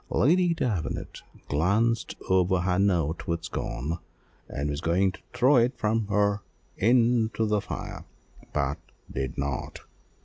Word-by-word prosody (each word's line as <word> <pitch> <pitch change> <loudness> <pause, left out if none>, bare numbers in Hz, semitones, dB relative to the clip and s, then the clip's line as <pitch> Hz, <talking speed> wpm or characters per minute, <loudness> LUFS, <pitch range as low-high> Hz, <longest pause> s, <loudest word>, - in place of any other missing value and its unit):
Lady 175 +5 +3
Davenant 110 - -2 0.3
glanced 105 +10 +1
over 95 0 +3
her 90 +1 +1
note 85 -5 +1
with 85 -1 -1
scorn, 75 +8 -3 0.5
and 70 +2 -2
was 70 +1 -3
going 95 +3 +2
to - - -14
throw 130 +3 +4
it 120 +3 +3
from 110 0 0
her 100 -1 +2 0.3
into 115 0 +3
the 105 -1 +1
fire, - - -6 0.5
but 70 +1 -1 0.3
did 65 -2 -3
not. 70 -2 -3
100 Hz, 130 wpm, -27 LUFS, 80-115 Hz, 0.5 s, throw